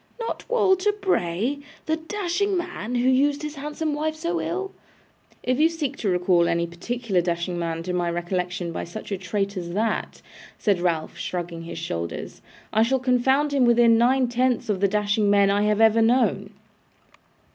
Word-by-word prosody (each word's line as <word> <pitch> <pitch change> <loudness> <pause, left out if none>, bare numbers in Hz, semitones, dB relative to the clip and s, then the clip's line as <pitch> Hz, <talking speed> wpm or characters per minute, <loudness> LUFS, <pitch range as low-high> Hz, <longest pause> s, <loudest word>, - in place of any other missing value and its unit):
'Not 460 +1 -5
Walter 415 -4 +3
Bray! 275 - -1 0.3
The 315 0 0
dashing 385 +3 -1
man, 345 -10 -4
who 245 +1 +1
used 285 +3 +2
his 300 -1 -4
handsome 300 +2 -3
wife 310 +1 -2
so 340 +2 -2
ill?' 385 +3 -3 0.7
'If 255 +2 0
you 320 +2 +5
seek 300 -5 -3
to 210 - -1
recall 180 -1 +3
any 170 0 +1
particular 195 +3 -2
dashing 175 0 -2
man 165 -1 -3
to 180 +1 -3
my 175 -1 0
recollection 175 0 -2
by - - -4
such 210 +5 -8
a 195 - -1
trait 200 +2 -2
as 170 -1 -5
that,' 220 +2 -2 0.3
said 200 -4 +1
Ralph, 165 -3 -1
shrugging 170 -2 -4
his 170 - -7
shoulders, 85 - -5 0.3
'I 220 - +4
shall 260 +4 +2
confound 265 +3 +2
him 275 -2 +3
with 240 -1 +4
nine 240 +2 +4
tenths 245 -1 0
of 200 -3 0
the 200 - +3
dashing 210 +1 +1
men 200 -1 +4
I 205 +1 +2
have 210 0 +2
ever 225 0 +5
known. 225 -4 +2
225 Hz, 175 wpm, -24 LUFS, 180-290 Hz, 0.7 s, you